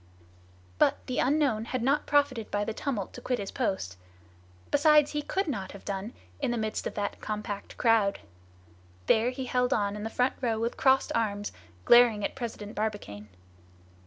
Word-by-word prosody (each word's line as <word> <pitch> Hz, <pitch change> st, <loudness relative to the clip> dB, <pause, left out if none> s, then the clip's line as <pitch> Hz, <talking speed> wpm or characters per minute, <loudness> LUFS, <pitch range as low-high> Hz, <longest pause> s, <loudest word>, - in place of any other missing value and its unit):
However, -, -, +4 dB
the 255 Hz, -, -2 dB
unknown 265 Hz, -5 st, +2 dB
had 250 Hz, 0 st, -3 dB
not 280 Hz, +4 st, +1 dB
profited 285 Hz, -6 st, +1 dB
by 205 Hz, 0 st, -1 dB
the 225 Hz, -, -3 dB
tumult 215 Hz, -6 st, -3 dB
to -, -, -9 dB
quit 250 Hz, -, -1 dB
his 200 Hz, -3 st, -5 dB
post. 190 Hz, -, -2 dB, 0.7 s
Besides 295 Hz, 0 st, +5 dB
he 295 Hz, -, -1 dB
could 385 Hz, +6 st, -2 dB
not 200 Hz, -10 st, -4 dB
have 200 Hz, -, -12 dB
done 195 Hz, -1 st, -3 dB
it 230 Hz, -, -8 dB, 0.3 s
in -, -, 0 dB
the 240 Hz, -, -1 dB
midst 220 Hz, -1 st, -2 dB
of -, -, -7 dB
that 205 Hz, -1 st, -3 dB
compact 210 Hz, -1 st, -5 dB
crowd. 225 Hz, -4 st, +3 dB, 0.9 s
There 225 Hz, -, +3 dB
he 255 Hz, +1 st, -5 dB
held 250 Hz, +1 st, +1 dB
on 205 Hz, -3 st, 0 dB
in 210 Hz, -, -6 dB
the 220 Hz, -, -3 dB
front 250 Hz, +3 st, +1 dB
row 230 Hz, -3 st, 0 dB
with 230 Hz, +1 st, -1 dB
crossed 265 Hz, 0 st, +3 dB
arms, 205 Hz, -3 st, -1 dB, 0.3 s
glaring 235 Hz, -4 st, +6 dB
at -, -, -2 dB
President 225 Hz, -5 st, -6 dB
Barbicane. 205 Hz, -, -4 dB
225 Hz, 180 wpm, -28 LUFS, 205-260 Hz, 0.9 s, glaring